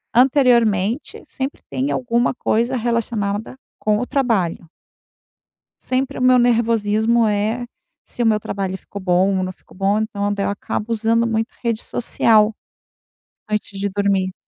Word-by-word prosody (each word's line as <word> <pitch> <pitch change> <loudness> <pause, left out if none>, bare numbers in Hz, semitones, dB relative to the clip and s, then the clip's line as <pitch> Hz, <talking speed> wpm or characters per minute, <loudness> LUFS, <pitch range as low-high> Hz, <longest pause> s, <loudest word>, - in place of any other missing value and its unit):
Anteriormente, 240 -3 +3
sempre 270 +1 -5
tem 270 +3 -1
alguma 240 -1 +1
coisa 240 +1 0
relacionada 225 -2 -2 0.2
com 210 0 +1
o 250 - -3
trabalho. 215 -11 0 1.2
Sempre 265 +2 -2
o - - -2
meu 255 0 +5
nervosismo 230 -1 +2
é, 215 +4 -1 0.4
se - - -11
o 240 - +3
meu 215 -1 +3
trabalho 195 -2 -3
ficou 200 +1 -9
bom, 185 +1 +2
ou 185 - 0
não 185 - -4
ficou 185 - -21
bom, 200 +2 +2
então. 205 -1 -2
Daí 200 -1 -2
eu - - 0
acabo 210 +2 -4
usando 230 +1 +2
muito 225 0 -1
rede 230 -2 -1
social, 220 -2 +3 1.0
antes 210 -2 -3
de 200 - 0
dormir. 195 -1 0
220 Hz, 145 wpm, -20 LUFS, 200-240 Hz, 1.2 s, meu